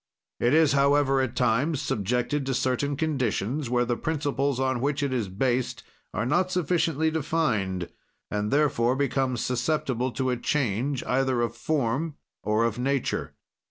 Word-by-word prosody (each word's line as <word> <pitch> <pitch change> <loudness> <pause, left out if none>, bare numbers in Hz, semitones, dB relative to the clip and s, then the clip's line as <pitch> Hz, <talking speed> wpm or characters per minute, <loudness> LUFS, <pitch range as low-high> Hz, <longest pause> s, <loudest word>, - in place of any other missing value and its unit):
"It 120 +5 +3
is, 160 -2 +5
however, 140 -1 +3
at 130 -1 -2
times 125 +6 +1
subjected 125 +8 -1
to 135 - 0
certain 130 +3 0
conditions, 135 -3 -1
where 125 0 +2
the 120 0 0
principles 140 -2 -1
on 130 -2 0
which 145 +1 0
it 140 -2 0
is 115 -6 -1
based 125 +6 -1 0.3
are 105 - -2
not 160 +8 +2
sufficiently 165 -3 +1
defined, 120 - 0 0.4
and, 105 0 -1
therefore, 130 -4 +2
becomes 135 -3 0
susceptible 125 -1 0
to 130 -1 0
a 125 - -1
change, 130 0 -1
either 130 -1 +1
of 115 0 -2
form 145 +3 -1 0.3
or 105 +2 +1
of 115 0 -2
nature. 135 0 -1
130 Hz, 150 wpm, -26 LUFS, 120-145 Hz, 0.4 s, is